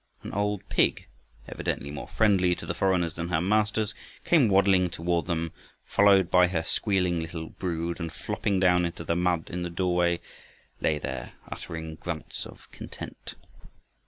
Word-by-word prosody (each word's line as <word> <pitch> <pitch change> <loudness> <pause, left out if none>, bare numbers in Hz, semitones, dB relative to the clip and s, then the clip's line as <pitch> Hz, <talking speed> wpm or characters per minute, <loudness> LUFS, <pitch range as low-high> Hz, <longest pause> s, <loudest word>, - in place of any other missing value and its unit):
An - - -7
old 105 0 -1
pig, - - +2 0.4
evidently 70 - -3
more 70 -3 -6
friendly 95 -5 +3
to - - -9
the - - -2
foreigners 90 -4 +1
than 85 0 -4
her 80 - +2
masters, 105 +3 +1 0.3
came 155 -8 +5
waddling 95 -2 +4
toward 85 0 -1
them 85 -2 -1 0.3
followed 100 -3 +4
by 90 0 +6
her 85 -2 -1
squealing 90 -3 +1
little 80 0 -5
brood, 85 -1 -3
and 85 -1 -4
flopping 100 -2 -1
down 90 -1 +4
into 85 -1 -3
the 85 - 0
mud 90 -2 0
in 90 - -3
the 85 - -2
doorway 85 -1 +1 0.6
lay 75 - +1
there 65 -4 -5 0.2
uttering 80 -1 -6
grunts 85 -3 -5
of - - -15
content. - - -8
90 Hz, 160 wpm, -27 LUFS, 85-95 Hz, 0.6 s, by